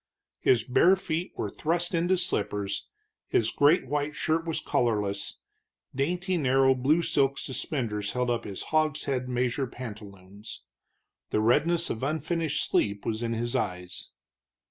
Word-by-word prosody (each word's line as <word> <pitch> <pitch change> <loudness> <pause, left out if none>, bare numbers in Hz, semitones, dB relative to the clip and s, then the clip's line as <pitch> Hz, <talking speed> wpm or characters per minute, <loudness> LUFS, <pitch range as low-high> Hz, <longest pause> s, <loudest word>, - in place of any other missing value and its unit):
His 120 -4 +3
bare 170 +10 +5
feet 175 -2 -3
were - - -1
thrust 175 +3 -1
into 175 +2 +2
slippers, 105 - -2 0.4
his 115 -1 +2
great 145 +2 +4
white 145 +2 -1
shirt 165 +1 0
was 160 -1 -1
collarless, 105 -8 -1 0.6
dainty 175 +7 0
narrow 135 -2 +4
blue 145 +6 +2
silk 140 -3 +2
suspenders 115 -7 -3
held 125 -1 0
up 115 -1 -1
his 100 -2 -6
hogshead 140 -4 +1
measure 125 +2 0
pantaloons. 105 - -10 0.7
The - - +1
redness 155 +10 +2
of 110 - -4
unfinished 155 +2 -1
sleep 100 -1 0
was 110 0 -2
in 115 -1 -1
his 120 +2 -2
eyes. 90 -7 -3
130 Hz, 135 wpm, -28 LUFS, 110-155 Hz, 0.7 s, bare